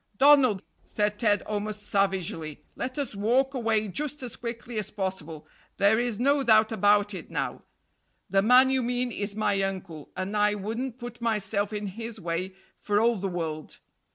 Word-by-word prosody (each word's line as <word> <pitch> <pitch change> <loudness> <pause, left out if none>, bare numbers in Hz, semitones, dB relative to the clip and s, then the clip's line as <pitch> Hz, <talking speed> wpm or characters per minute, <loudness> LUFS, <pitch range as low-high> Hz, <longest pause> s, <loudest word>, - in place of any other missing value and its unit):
"Donald," 265 -7 +5 0.2
said 210 0 -1
Ted 210 -3 +2
almost 210 0 -4
savagely 185 -6 -1
"let 255 +2 -4
us 275 -7 -3
walk 250 +7 +2
away 225 -4 +1
just 295 +7 -3
as 240 -2 -5
quickly 235 -1 -5
as 205 - -4
possible. 185 -6 -5 0.3
There 200 +3 +4
is 240 -3 -1
no 280 +4 +3
doubt 220 -3 +4
about 205 -1 +3
it 190 - -8
now. - - -3 0.7
The 195 0 +3
man 250 +5 +6
you 265 -1 +2
mean 245 0 -1
is 205 -2 -3
my 205 -2 +1
uncle, 185 -6 -4
and 185 +3 -3
I 210 0 +3
wouldn't 225 +5 -4
put 240 -1 -9
myself 210 -2 0
in 210 -1 -3
his 225 +3 -6
way 180 +2 -3 0.2
for 205 0 +1
all 230 +1 +3
the 195 +1 -2
world. 160 -4 -4
210 Hz, 170 wpm, -27 LUFS, 195-240 Hz, 0.7 s, man